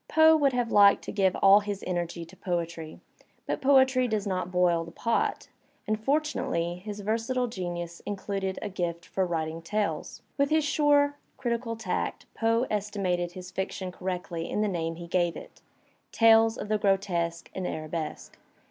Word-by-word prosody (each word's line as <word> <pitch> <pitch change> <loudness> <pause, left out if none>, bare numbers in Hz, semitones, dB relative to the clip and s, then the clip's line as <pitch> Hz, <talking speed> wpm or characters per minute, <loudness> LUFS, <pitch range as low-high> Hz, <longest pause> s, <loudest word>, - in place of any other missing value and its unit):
Poe 320 0 +6
would 285 -4 +3
have 245 -2 0
liked 200 -1 +6
to - - -5
give 190 -2 +2
all 195 +1 +8
his 205 -1 -5
energy 175 -1 -3
to 170 +3 -16
poetry, 170 -3 -4 0.5
but - - -2
poetry 265 -2 +4
does 215 -3 -1
not 185 -2 -2
boil 175 -2 +2
the 165 - -9
pot, 230 +6 -1 0.4
and 215 0 -2
fortunately 270 - 0
his 210 -1 -6
versatile 230 +4 0
genius 175 -6 -5
included 195 -1 -3
a 210 - -3
gift 175 -3 -3
for 190 -1 -1
writing 165 -1 -3
tales. 205 +5 -3 0.2
With 280 0 +3
his 310 -1 +2
suret^ 290 -1 +3 0.2
critical 235 -2 -2
tact 225 - -3
Poe 230 +2 +1
estimated 195 -4 -1
his 180 0 -9
fiction 190 0 -4
correctly 180 -2 -4
in 210 - -1
the 215 - +2
name 165 -4 -2
he 170 +1 -8
gave 175 -1 0
it: - - -12 0.5
"Tales 225 0 +5
of 205 - -5
the 215 0 +1
Grotesque 180 -4 0
and 185 -1 -3
Arabesque." 155 0 -5
195 Hz, 165 wpm, -28 LUFS, 175-225 Hz, 0.5 s, all